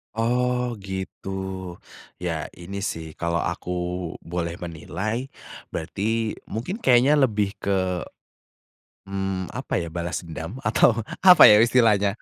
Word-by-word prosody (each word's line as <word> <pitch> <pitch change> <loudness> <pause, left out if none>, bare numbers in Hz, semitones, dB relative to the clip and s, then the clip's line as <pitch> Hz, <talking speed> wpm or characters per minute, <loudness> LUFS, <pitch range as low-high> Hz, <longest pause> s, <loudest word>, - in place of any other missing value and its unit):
Oh 125 +1 0
gitu. 95 0 -6 0.9
Ya 80 -3 -2
ini 100 +3 -6
sih 80 -1 -5
kalau 85 -1 0
aku - - -4 0.5
boleh 85 0 -4
menilai, 95 - -4 0.5
berarti 110 +7 -2
mungkin 125 - -4
kayaknya 130 - +4
lebih 105 -7 +1
ke, 95 -2 0 1.2
mmm, 95 -2 -3
apa - - -4
ya, 85 - -6
balas 85 +2 -3
dendam 85 - -7
atau 110 +1 +4 0.2
apa 180 -2 +8
ya 105 - +8
istilahnya, 110 -4 +4
100 Hz, 115 wpm, -24 LUFS, 85-115 Hz, 1.2 s, apa